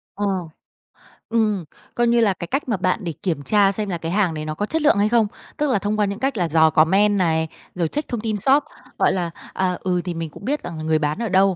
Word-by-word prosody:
Ờ. 205 Hz, -, -2 dB, 1.0 s
Ừm, 215 Hz, -5 st, +1 dB, 0.3 s
coi 240 Hz, 0 st, +2 dB
như 235 Hz, 0 st, +4 dB
là, 205 Hz, -4 st, +3 dB
cái 175 Hz, -2 st, -7 dB
cách 275 Hz, -, -2 dB
mà 220 Hz, -, +1 dB
bạn 185 Hz, +3 st, +1 dB
để 170 Hz, -2 st, -3 dB
kiểm 165 Hz, -6 st, -1 dB
tra 200 Hz, +3 st, +4 dB
xem 205 Hz, +1 st, -3 dB
là 175 Hz, -, -2 dB
cái 165 Hz, 0 st, -4 dB
hàng 190 Hz, -4 st, +2 dB
này 155 Hz, -1 st, -5 dB
nó 155 Hz, -, -3 dB
có 205 Hz, -, -1 dB
chất 320 Hz, +8 st, -1 dB
lượng 300 Hz, -7 st, +4 dB
hay 205 Hz, +1 st, +3 dB
không. 230 Hz, -2 st, +3 dB, 0.3 s
Tức 300 Hz, -1 st, +1 dB
là 220 Hz, -, +2 dB
thông 210 Hz, +2 st, -1 dB
qua 205 Hz, -, +4 dB
những 200 Hz, +1 st, -4 dB
cách 270 Hz, -3 st, -1 dB
là 175 Hz, -, +1 dB
dò 160 Hz, 0 st, +5 dB
comment 195 Hz, +7 st, +4 dB
này, 160 Hz, -3 st, +1 dB, 0.3 s
rồi 170 Hz, -3 st, 0 dB
check 295 Hz, -, -3 dB
thông 240 Hz, -3 st, -3 dB
tin 215 Hz, -2 st, -1 dB
shop, 270 Hz, +8 st, +3 dB, 0.4 s
gọi -, -, +4 dB
là, 175 Hz, -3 st, -2 dB, 0.2 s
à, 185 Hz, -1 st, 0 dB
ừ, 180 Hz, -1 st, 0 dB
thì 175 Hz, -, -2 dB
mình 165 Hz, -1 st, -4 dB
cũng 175 Hz, -, -12 dB
biết 290 Hz, +3 st, -1 dB
rằng 160 Hz, -3 st, -6 dB
người 155 Hz, -1 st, +3 dB
bán 150 Hz, +4 st, -1 dB
ở 230 Hz, -2 st, -2 dB
đâu 190 Hz, 0 st, +4 dB
195 Hz, 265 wpm, -22 LUFS, 170-220 Hz, 1.0 s, dò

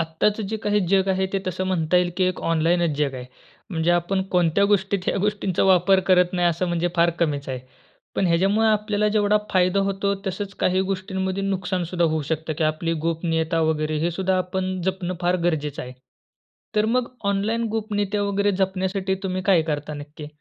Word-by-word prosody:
आत्ताचं 165 Hz, +7 st, 0 dB
जे 220 Hz, +3 st, -3 dB
काही 210 Hz, 0 st, +2 dB
जग 195 Hz, 0 st, +3 dB
आहे 190 Hz, 0 st, +1 dB
ते 195 Hz, -, +1 dB
तसं 185 Hz, +1 st, -2 dB
म्हणता 180 Hz, -2 st, +1 dB
येईल 180 Hz, 0 st, +2 dB
की 185 Hz, -, +2 dB
एक 185 Hz, -1 st, -1 dB
ऑनलाईनच 165 Hz, -1 st, +2 dB
जग 145 Hz, -3 st, 0 dB
आहे. 125 Hz, -1 st, -6 dB, 0.5 s
म्हणजे 165 Hz, -1 st, +1 dB
आपण 175 Hz, +2 st, +1 dB
कोणत्या 180 Hz, +2 st, +3 dB
गोष्टीत 195 Hz, 0 st, +1 dB
ह्या -, -, +1 dB
गोष्टींचा 205 Hz, -3 st, 0 dB
वापर 190 Hz, 0 st, +4 dB
करत 180 Hz, -1 st, +4 dB
नाही 175 Hz, -1 st, +2 dB
असं 170 Hz, +2 st, -1 dB
म्हणजे 175 Hz, 0 st, 0 dB
फार 170 Hz, 0 st, +4 dB
कमीच 145 Hz, -4 st, 0 dB
आहे. 130 Hz, -1 st, -4 dB, 0.5 s
पण 195 Hz, -, +1 dB
ह्याच्यामुळं 195 Hz, +6 st, +2 dB
आपल्याला 210 Hz, -1 st, +1 dB
जेवढा 210 Hz, 0 st, +3 dB
फायदा 185 Hz, +1 st, +3 dB
होतो 200 Hz, 0 st, 0 dB
तसंच 195 Hz, +1 st, -4 dB
काही 185 Hz, +1 st, +2 dB
गोष्टींमध्ये 190 Hz, 0 st, -2 dB
नुकसान 185 Hz, -2 st, -1 dB
सुद्धा 175 Hz, 0 st, 0 dB
होऊ 160 Hz, -1 st, +1 dB
शकतं 160 Hz, 0 st, -2 dB
की 160 Hz, -, +2 dB
आपली 155 Hz, +2 st, 0 dB
गोपनीयता 165 Hz, 0 st, 0 dB
वगैरे 155 Hz, 0 st, -1 dB
हे 170 Hz, -, +1 dB
सुद्धा 190 Hz, +2 st, 0 dB
आपण 185 Hz, 0 st, -2 dB
जपणं 185 Hz, -1 st, -2 dB
फार 175 Hz, +1 st, +2 dB
गरजेचं 150 Hz, -4 st, -1 dB
आहे. 125 Hz, 0 st, -8 dB, 0.8 s
तर 210 Hz, -, +4 dB
मग 250 Hz, -1 st, +1 dB, 0.2 s
ऑनलाईन 215 Hz, +4 st, 0 dB
गोपनीयता 205 Hz, -2 st, -1 dB
वगैरे 200 Hz, 0 st, +1 dB
जपण्यासाठी 190 Hz, 0 st, -1 dB
तुम्ही 185 Hz, -1 st, -2 dB
काय 185 Hz, -4 st, +4 dB
करता 150 Hz, 0 st, -3 dB
नक्की? 145 Hz, +1 st, -9 dB
185 Hz, 180 wpm, -23 LUFS, 165-195 Hz, 0.8 s, वापर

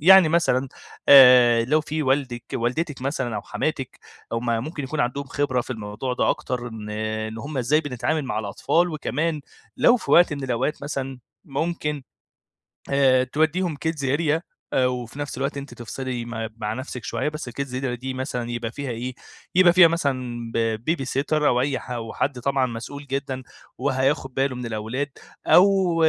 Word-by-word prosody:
يعني 185 Hz, +1 st, +8 dB
مثلًا 135 Hz, -6 st, +2 dB, 0.4 s
آآ، 125 Hz, -4 st, +8 dB
لو 150 Hz, +6 st, +2 dB
في 155 Hz, +1 st, -3 dB
والدِك، 130 Hz, -3 st, 0 dB
والدتِك 130 Hz, +4 st, -2 dB
مثلًا 130 Hz, -5 st, -2 dB
أو -, -, -4 dB
حماتِك -, -, -3 dB, 0.3 s
هُم 115 Hz, +1 st, -2 dB, 0.2 s
ممكن 155 Hz, -2 st, -5 dB
يكون 150 Hz, +3 st, -3 dB
عندهم 125 Hz, +4 st, -1 dB
خبرة 130 Hz, -2 st, 0 dB
في -, -, -8 dB
الموضوع 110 Hz, +2 st, -4 dB
ده -, -, +2 dB
أكتر، 125 Hz, -1 st, -3 dB
إن 105 Hz, -2 st, -8 dB
إن 110 Hz, +1 st, -3 dB
هُم 140 Hz, +2 st, -5 dB
إزاي 145 Hz, +6 st, +3 dB
بنتعامل 145 Hz, +2 st, -2 dB
مع 105 Hz, -4 st, -2 dB
الأطفال، 110 Hz, -, +1 dB
وكمان 155 Hz, +1 st, -2 dB, 0.4 s
لو 245 Hz, -, +5 dB
في -, -, -6 dB
وقت 175 Hz, -2 st, +6 dB
من 140 Hz, -2 st, -4 dB
الأوقات 130 Hz, +4 st, -1 dB
مثلًا 135 Hz, -2 st, -4 dB, 0.3 s
ممكن 150 Hz, -1 st, -2 dB, 0.9 s
آآ، 135 Hz, -2 st, +4 dB
توديهم 160 Hz, +4 st, 0 dB
kids 155 Hz, -4 st, -2 dB
area 160 Hz, -1 st, +1 dB, 0.3 s
آآ، 130 Hz, -1 st, +3 dB
وفي 125 Hz, +1 st, -5 dB
نَفس 145 Hz, -3 st, -4 dB
الوقت 135 Hz, +1 st, -2 dB
أنتِ 140 Hz, -3 st, -7 dB
تفصلي 120 Hz, +1 st, -5 dB
م 115 Hz, -1 st, -4 dB
مع 105 Hz, -1 st, -2 dB
نَفسِك 125 Hz, -1 st, -6 dB
شوية، 150 Hz, -, -1 dB
بس 150 Hz, -5 st, -6 dB
الkids 130 Hz, +1 st, -4 dB
area 125 Hz, -3 st, -2 dB
دي 130 Hz, +1 st, -4 dB
مثلًا 125 Hz, -2 st, -3 dB
يبقى 120 Hz, -1 st, -3 dB
فيها 140 Hz, +1 st, -5 dB
إيه، 125 Hz, +2 st, -5 dB, 0.4 s
يبقى 180 Hz, -2 st, +7 dB
فيها 180 Hz, -2 st, +8 dB
مثلًا 130 Hz, -8 st, -2 dB, 0.3 s
b -, -, -21 dB
babysitter 135 Hz, 0 st, -2 dB
أو 125 Hz, -3 st, +3 dB
أي 135 Hz, -1 st, 0 dB
ح 125 Hz, -, -10 dB
أو 115 Hz, -2 st, -4 dB
حد 135 Hz, -3 st, -1 dB
طبعًا 135 Hz, +1 st, +1 dB
مسؤول 130 Hz, +4 st, -7 dB
جدًا 135 Hz, -1 st, -3 dB, 0.3 s
وهياخد 135 Hz, 0 st, 0 dB
باله 135 Hz, -1 st, 0 dB
من 125 Hz, -, -5 dB
الأولاد. 115 Hz, +6 st, -3 dB, 0.4 s
أو 190 Hz, -2 st, +5 dB
130 Hz, 170 wpm, -24 LUFS, 120-150 Hz, 0.9 s, يعني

